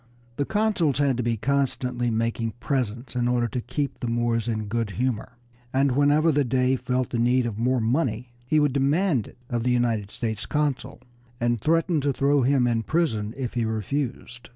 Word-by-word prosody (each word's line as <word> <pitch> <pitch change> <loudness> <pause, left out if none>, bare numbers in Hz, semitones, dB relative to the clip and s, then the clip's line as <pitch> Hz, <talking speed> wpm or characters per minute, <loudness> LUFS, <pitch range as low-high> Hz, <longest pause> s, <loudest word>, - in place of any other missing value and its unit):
The 140 - 0
consuls 205 -9 +1
had 140 -3 +2
to - - 0
be 115 -1 0
constantly 125 -1 0
making 115 0 -1
presents 120 -2 -2
in 120 -1 +1
order 120 -1 +1
to 125 +3 -3
keep 145 +3 -3
the 120 - -3
Moors 115 -1 0
in 110 -2 -1
a - - -5
good 115 +1 -2
humor, 125 -1 -2 0.3
and 135 +1 +2
whenever 145 +4 +4
the 145 -1 +2
Dey 130 +1 +2
felt 125 0 -2
the 120 - -1
need 125 +1 +3
of 110 -2 -4
more 125 +2 +2
money 120 0 0 0.2
he 155 +4 +3
would 145 -3 +2
demand 140 - +1
it - - -16
of 120 -2 -2
the 125 - 0
United 115 -5 +1
States 110 -1 -4
consul, 145 -3 -2 0.4
and 120 -2 0
threaten 165 +1 +2
to 140 +1 +1
throw 140 +2 +2
him 130 0 +3
in 115 -2 +1
prison 115 -7 -1
if 130 -3 -3
he 120 - 0
refused. 120 +2 -3
125 Hz, 195 wpm, -25 LUFS, 115-140 Hz, 0.4 s, whenever